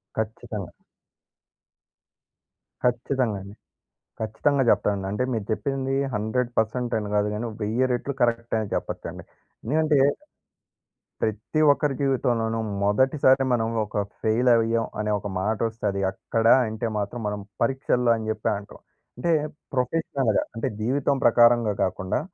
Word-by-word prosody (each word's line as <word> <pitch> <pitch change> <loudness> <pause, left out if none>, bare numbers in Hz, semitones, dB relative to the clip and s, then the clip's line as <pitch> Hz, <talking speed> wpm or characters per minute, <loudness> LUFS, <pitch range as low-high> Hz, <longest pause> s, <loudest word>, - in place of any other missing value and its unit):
ఖచ్చితంగా. 110 -2 -4 2.1
ఖచ్చితంగా 125 -2 0
అండి. 100 +2 -11 0.7
ఖచ్చితంగా 135 +6 +1
చెప్తానండి. 100 -2 +1
అంటే 105 +5 0
మీరు 110 -4 -2
చెప్పింది 135 +3 -1 0.2
100% 120 +2 -1
అని 105 -1 -5
కాదు 105 0 +2
కానీ, 120 +3 -3
1000 115 +5 +1
రెట్లు 130 +3 -3
కరెక్ట్ 115 -1 +1
అని 105 - -4
చెప్పొచ్చండి. - - -5 0.4
ఎందుకంటే... 150 +2 +2 1.2
ప్రతి 110 +8 -1
ఒక్కరి 145 -1 0
జీవితంలోనూ 120 -4 +1 0.2
మొదటిసారి 130 +5 +3
మనం 115 -2 +2 0.2
ఒక 105 0 -2 0.2
ఫెయిల్ 115 +3 +2
అయ్యాం 115 0 +3
అనే 105 0 0
ఒక 105 - -6
మాట 105 +4 0
వస్తుంది. 105 -3 -2
అక్కడ 115 +3 -2 0.2
అంటే 110 +1 -3
మాత్రం 105 +4 -3
మనం 105 0 -3 0.2
పరీక్షల్లో 125 -3 +2
అని 110 -1 -5
చెప్పి 110 -1 -2
అంటాం. 100 0 -11 0.4
అంటే 170 +7 0 0.4
ప్రొఫెషనల్‌గా, 135 -3 0
అంటే 115 - -2
జీవితం 135 +5 +1
ప్రకారంగా 120 -2 +5
కాకుండా 95 +3 -1
115 Hz, 120 wpm, -25 LUFS, 105-130 Hz, 2.1 s, ప్రకారంగా